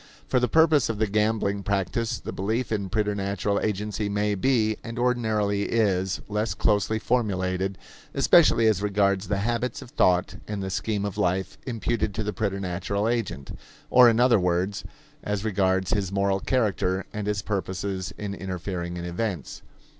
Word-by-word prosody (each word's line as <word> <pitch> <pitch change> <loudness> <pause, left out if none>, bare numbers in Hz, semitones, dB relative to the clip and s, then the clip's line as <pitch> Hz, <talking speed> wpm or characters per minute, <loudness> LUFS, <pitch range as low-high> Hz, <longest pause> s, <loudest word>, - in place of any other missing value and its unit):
For 125 - +2
the 125 - +2
purpose 155 -1 +4
of 115 - -2
the 110 - +2
gambling 105 -1 0
practice 100 +3 -1
the - - -6
belief 110 +6 -2
in 100 -3 -1
preternatural 100 -1 0
agency 105 0 -2
may 105 +1 0
be, 110 0 +1
and 115 0 -7
ordinarily 110 -5 +1
is, 95 -4 +1
less 105 +1 -1
closely 105 +1 +1
formulated, 95 -5 -1 0.4
especially 150 -9 +5
as 110 -3 +3
regards 100 -1 +1
the 100 - 0
habits 120 +1 -1
of 120 - -11
thought 90 0 +2
and 105 -2 -4
the 95 - -4
scheme 105 +1 -1
of 100 - -4
life 95 +2 0
imputed 115 -3 -1
to 110 - -1
the 105 0 -3
preternatural 100 0 -2
agent; 115 - -2 0.4
or, 125 -1 +8
in 115 0 +2
other 120 -3 +5
words, 90 +2 0 0.4
as 105 0 -2
regards 95 -3 +1
his 100 -3 0
moral 100 0 +1
character 95 -5 0
and 105 -1 -4
his 105 -2 -1
purposes 95 -1 -3
in 100 -1 -4
interfering 90 -2 -4
in 85 - -5
events. 90 - -4
100 Hz, 160 wpm, -25 LUFS, 95-110 Hz, 0.4 s, or